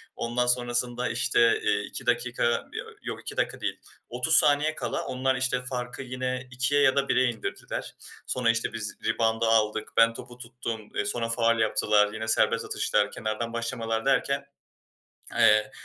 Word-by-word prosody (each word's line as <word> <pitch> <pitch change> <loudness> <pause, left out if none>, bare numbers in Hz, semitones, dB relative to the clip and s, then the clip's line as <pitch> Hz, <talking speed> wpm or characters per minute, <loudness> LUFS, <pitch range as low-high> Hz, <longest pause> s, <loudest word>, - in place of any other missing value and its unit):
Ondan 125 +1 -1
sonrasında, 120 0 0
işte, 120 0 +3
eee, - - +2
2 - - -7
dakika, 125 0 0 0.3
yo - - -4 0.2
yok - - -5
2 - - -8
dakika - - -1
değil, - - -3 0.3
30 125 +7 +1
saniye 150 +2 +4
kala - - -3
onlar, 130 +1 0
işte, 125 0 -1
farkı 125 0 -4
yine 130 0 -4
2'ye 130 +4 +1
ya 135 -2 +4
da 140 0 +1
1'e 130 - +4
indirdiler. 115 -2 -5 0.3
Sonra, 125 -2 +1
işte, 115 -1 0
biz 110 -2 -5
rebound'ı 115 0 +1
aldık. 110 -1 +2
Ben 115 0 +6
topu 120 +1 -10
tuttum. 115 -3 -6
Eee, 105 - 0
sonra 115 +3 -2
faul 115 0 +2
yaptılar. 105 -1 +3
Yine 110 0 -5
serbest 110 - +2
atışlar, - - 0
kenardan 110 +2 -3
başlamalar 115 -1 -2
derken, 140 +1 +1 0.9
eee, 105 -1 +5
120 Hz, 160 wpm, -27 LUFS, 115-125 Hz, 0.9 s, Ben